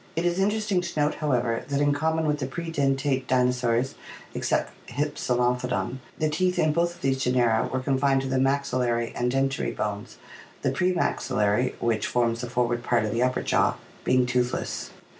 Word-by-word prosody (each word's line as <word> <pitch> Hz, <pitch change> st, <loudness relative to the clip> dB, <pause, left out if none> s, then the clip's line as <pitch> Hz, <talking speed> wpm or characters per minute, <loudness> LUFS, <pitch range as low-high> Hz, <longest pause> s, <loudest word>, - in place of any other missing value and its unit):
It 165 Hz, +2 st, 0 dB
is 175 Hz, +1 st, +1 dB
interesting 210 Hz, -1 st, +1 dB
to 170 Hz, -3 st, -4 dB
note, 150 Hz, 0 st, +2 dB
however, 125 Hz, -6 st, 0 dB
that 140 Hz, -1 st, -1 dB
in 145 Hz, 0 st, +3 dB
common 160 Hz, +2 st, 0 dB
with 150 Hz, -1 st, 0 dB
the 130 Hz, -, -2 dB
predentate 140 Hz, -4 st, -1 dB
dinosaurs 125 Hz, 0 st, +1 dB, 0.4 s
(except -, -, 0 dB, 0.2 s
Hypsilophodon) 125 Hz, -3 st, -1 dB, 0.2 s
the 155 Hz, -, +1 dB
teeth 180 Hz, +4 st, 0 dB
in 155 Hz, -1 st, +3 dB
both 170 Hz, +1 st, +1 dB
of -, -, -19 dB
these 135 Hz, -1 st, 0 dB
genera 120 Hz, -3 st, +2 dB
were 130 Hz, -, -1 dB
confined 135 Hz, 0 st, +2 dB
to -, -, -3 dB
the 130 Hz, 0 st, +1 dB
maxillary 125 Hz, -4 st, 0 dB
and 125 Hz, 0 st, 0 dB
dentary 135 Hz, 0 st, 0 dB
bones, 105 Hz, -1 st, -4 dB, 0.5 s
the -, -, +2 dB
pre 185 Hz, 0 st, +1 dB
maxillary, 125 Hz, -, +1 dB
which 115 Hz, -2 st, 0 dB
forms 115 Hz, -1 st, +1 dB
the 125 Hz, -, -5 dB
forward 120 Hz, -1 st, 0 dB
part 120 Hz, -2 st, +2 dB
of 105 Hz, -, -2 dB
the 115 Hz, -, 0 dB
upper 130 Hz, 0 st, +1 dB
jaw, -, -, +2 dB, 0.3 s
being 125 Hz, 0 st, +3 dB
toothless. 125 Hz, 0 st, -1 dB
130 Hz, 175 wpm, -26 LUFS, 125-150 Hz, 0.5 s, in